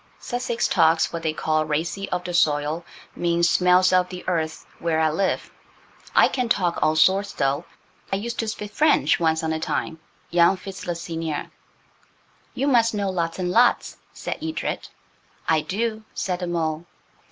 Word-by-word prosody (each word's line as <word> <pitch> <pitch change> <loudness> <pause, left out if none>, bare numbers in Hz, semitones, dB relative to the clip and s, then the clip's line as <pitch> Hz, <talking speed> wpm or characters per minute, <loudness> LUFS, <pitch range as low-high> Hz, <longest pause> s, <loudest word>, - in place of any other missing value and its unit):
Sussex 240 -1 -2
talks 165 +1 +3
what 170 - -3
they 160 -1 0
call 155 0 0
'racy 160 +6 -2
of 180 - -2
the 175 0 -5
soil'–means 170 +2 0
'smells 180 +2 +4
of 180 0 +3
the 180 -1 -9
earth' 160 -3 -2
where 165 -2 0
I 160 -1 +3
live. 190 +5 -1 0.6
I - - +7
can 250 -3 -2
talk 175 -5 +1
all 155 0 +3
sorts, 190 +5 +3
though. 140 +4 0 0.5
I - - +2
used 230 +4 -4
to 225 - -1
spit 210 -1 -5
French 305 -3 +3
once 160 -1 +1
on 160 0 0
a 160 - -2
time, 160 0 -3 0.3
young 170 +2 +4
Fitz 195 0 -9
le 175 - -1
seigneur." 165 -2 -4 1.0
"You 265 - -1
must 230 -5 +3
know 200 -2 -1
lots 170 -2 -2
and 180 -1 -1
lots," 240 +4 +3
said - - -5
Edred. 320 0 -3 0.6
"I 160 -1 +3
do," 220 +5 -2
said 180 -2 -2
the 180 - -3
mole. 165 -1 -2
175 Hz, 165 wpm, -23 LUFS, 160-195 Hz, 1.0 s, I